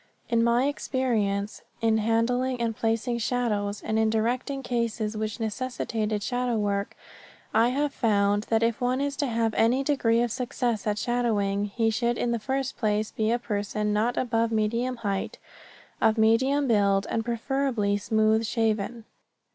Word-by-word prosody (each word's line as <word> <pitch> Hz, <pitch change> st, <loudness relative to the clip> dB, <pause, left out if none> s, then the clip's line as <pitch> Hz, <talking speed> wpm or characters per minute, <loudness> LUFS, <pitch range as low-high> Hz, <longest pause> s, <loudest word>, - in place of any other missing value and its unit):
In 230 Hz, -1 st, +3 dB
my 235 Hz, +2 st, +3 dB
experience 220 Hz, -8 st, -1 dB, 0.2 s
in 225 Hz, -1 st, +2 dB
handling 245 Hz, +3 st, +1 dB
and 230 Hz, -1 st, -1 dB
placing 230 Hz, +2 st, -1 dB
shadows, 210 Hz, -4 st, -1 dB
and 220 Hz, 0 st, 0 dB
in 220 Hz, 0 st, +3 dB
directing 245 Hz, +5 st, -1 dB
cases 230 Hz, -3 st, -2 dB
which 215 Hz, 0 st, -3 dB
necessitated 220 Hz, -2 st, -2 dB
shadow 245 Hz, -1 st, -1 dB
work, 200 Hz, -1 st, -1 dB, 0.6 s
I 225 Hz, +2 st, +4 dB
have 280 Hz, +2 st, -1 dB
found 205 Hz, -2 st, +1 dB
that 225 Hz, 0 st, +2 dB
if 230 Hz, 0 st, 0 dB
one 250 Hz, +1 st, +1 dB
is 280 Hz, 0 st, -1 dB
to 285 Hz, -, 0 dB
have 225 Hz, -2 st, 0 dB
any 245 Hz, +6 st, +2 dB
degree 240 Hz, -5 st, +2 dB
of 240 Hz, -, -2 dB
success 240 Hz, -3 st, -2 dB
at 210 Hz, 0 st, 0 dB
shadowing, 210 Hz, -5 st, 0 dB
he 225 Hz, +2 st, 0 dB
should 235 Hz, +1 st, 0 dB
in 240 Hz, -, 0 dB
the 235 Hz, -, 0 dB
first 265 Hz, +3 st, -2 dB
place 215 Hz, -1 st, 0 dB
be 220 Hz, 0 st, -1 dB
a 240 Hz, -, +2 dB
person 210 Hz, -2 st, -2 dB
not 225 Hz, +4 st, 0 dB
above 230 Hz, -2 st, +1 dB
medium 230 Hz, +4 st, 0 dB
height, 195 Hz, -1 st, -2 dB, 0.6 s
of 220 Hz, +1 st, +3 dB
medium 260 Hz, +6 st, +3 dB
build, 200 Hz, -3 st, +3 dB
and 225 Hz, -, 0 dB
preferably 235 Hz, -3 st, 0 dB
smooth 220 Hz, +1 st, +2 dB
shaven. 225 Hz, 0 st, -1 dB
225 Hz, 155 wpm, -26 LUFS, 215-245 Hz, 0.6 s, I